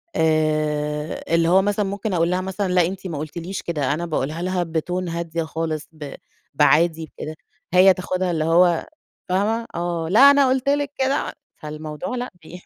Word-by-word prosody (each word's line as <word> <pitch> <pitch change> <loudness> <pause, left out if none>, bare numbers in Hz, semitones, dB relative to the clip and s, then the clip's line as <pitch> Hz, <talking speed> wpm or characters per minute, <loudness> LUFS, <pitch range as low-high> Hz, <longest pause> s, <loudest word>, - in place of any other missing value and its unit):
آآ، 155 -1 0
اللي 165 0 +3
هو 190 +2 +5
مثلًا 205 +1 0
ممكن 200 +1 -3
أقول 170 0 +2
لها 185 - 0
مثلًا 190 0 -2
لأ 180 -2 +4
أنتِ 190 0 -6
ما 160 -4 -5
قُلتيليش 170 +5 -5
كده 145 -5 -1
أنا 170 +3 -3
باقولها 155 0 -2
لها 185 0 0
بTone 175 +2 -3
هادية 170 -1 -3
خالص 160 -1 -4
ب 155 -3 -8 0.4
بعادي 165 +1 +3
بكده، 155 +1 -5 0.4
هي 185 +1 +7
تاخدها 185 0 -2
اللي 160 -2 0
هو 170 +1 +3 0.4
فاهمة 215 +5 0
آه، 170 -1 -2
لا 210 - +4
أنا 280 -2 +4
قُلت 265 +1 +1
لِك 285 0 +1
كده 270 +1 0 0.2
فالموضوع 155 - -6
لأ، 245 -1 -4
بي 180 +3 -11
170 Hz, 170 wpm, -22 LUFS, 155-190 Hz, 0.4 s, هي